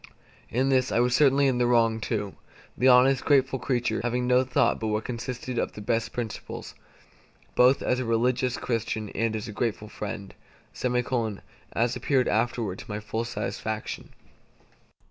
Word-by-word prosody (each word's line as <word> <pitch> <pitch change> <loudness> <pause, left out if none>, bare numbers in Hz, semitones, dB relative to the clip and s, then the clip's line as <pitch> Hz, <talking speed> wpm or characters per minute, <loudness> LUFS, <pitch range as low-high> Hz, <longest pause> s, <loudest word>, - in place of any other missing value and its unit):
In 130 +3 +1
this 130 -1 +2
I - - +2
was 125 0 +3
certainly 140 0 +4
in 130 -2 +2
the 120 - +3
wrong 115 -2 +3
too, 105 -3 -3 0.4
the 130 - +2
honest, 130 +1 +6
grateful 135 -2 +3
creature 120 -3 0
having 125 +1 -1
no 125 +1 +4
thought 130 0 +1
but 110 - -2
what 105 0 -1
consisted 125 0 -4
of - - -2
the - - -9
best 115 +2 -1
principles, 115 -4 -6 0.8
both 125 +2 +4
as 125 - +1
a 130 - -2
religious 125 +2 +1
Christian 110 -2 -2
and 110 +2 -1
as 110 +1 -4
a - - -6
grateful 105 -1 -2
friend; 100 -2 -6 0.4
as 120 -1 -2
appeared 130 -3 +1
afterward 110 -3 0
to - - -11
my 105 0 -3
full 110 +2 -3
satisfaction. 110 -2 -4
120 Hz, 160 wpm, -27 LUFS, 110-125 Hz, 0.8 s, honest